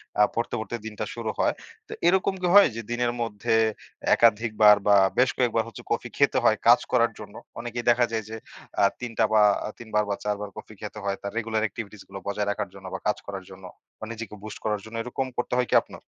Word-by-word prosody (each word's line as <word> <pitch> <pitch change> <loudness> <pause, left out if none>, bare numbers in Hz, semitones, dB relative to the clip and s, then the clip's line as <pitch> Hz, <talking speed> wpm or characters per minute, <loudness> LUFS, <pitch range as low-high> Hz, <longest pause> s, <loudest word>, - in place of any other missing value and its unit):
অ্যা 105 - +5
পড়তে, 120 +1 -1
পড়তে 115 +2 -4
দিনটা 105 -1 -4
শুরু 115 -2 -4
হয়। - - +3 0.3
তো - - -7
এরকম 190 +2 +3
কি 180 - +1
হয় 205 - +9
যে 115 - -3
দিনের 120 0 0
মধ্যে 115 +1 -1 0.6
একাধিকবার 110 -2 +5
বা 100 - +7 0.2
বেশ 130 0 +5
কয়েকবার 115 -3 +2
হচ্ছে 115 - -10
কফি - - -1
খেতে - - +3
হয় - - +4
কাজ - - +8
করার - - +3
জন্য। - - -10 0.2
অনেকেই 120 0 -5
দেখা 120 0 +4
যায় 110 -1 -1
যে 110 - -6 0.5
আ - - +5 0.2
৩টা 115 -2 0
বা 105 - +6 0.4
৩বার 110 -2 0
বা 100 - 0
৪বার 105 -1 -2
কফি 110 - -10
খেতে 105 0 -7
হয় 100 -1 -1
তার 100 - -5
রেগুলার 110 -1 -1
এক্টিভিটিস 105 0 -8
গুলো 95 - -8
বজায় 100 0 -1
রাখার 100 -2 -3
জন্য 95 -1 -13
বা - - -3
কাজ 105 - +1
করার 95 -2 -6
জন্য 95 0 -13 0.4
বা 110 - -6
নিজেকে 115 -1 -7
বুস্ট 110 - -7
করার 105 -2 0
জন্য। 115 +1 -10
এরকম 130 +2 -3
করতে 120 - -2
হয় 125 - +1
কি - - +2
আপনার? - - -12
110 Hz, 215 wpm, -26 LUFS, 105-120 Hz, 0.6 s, হয়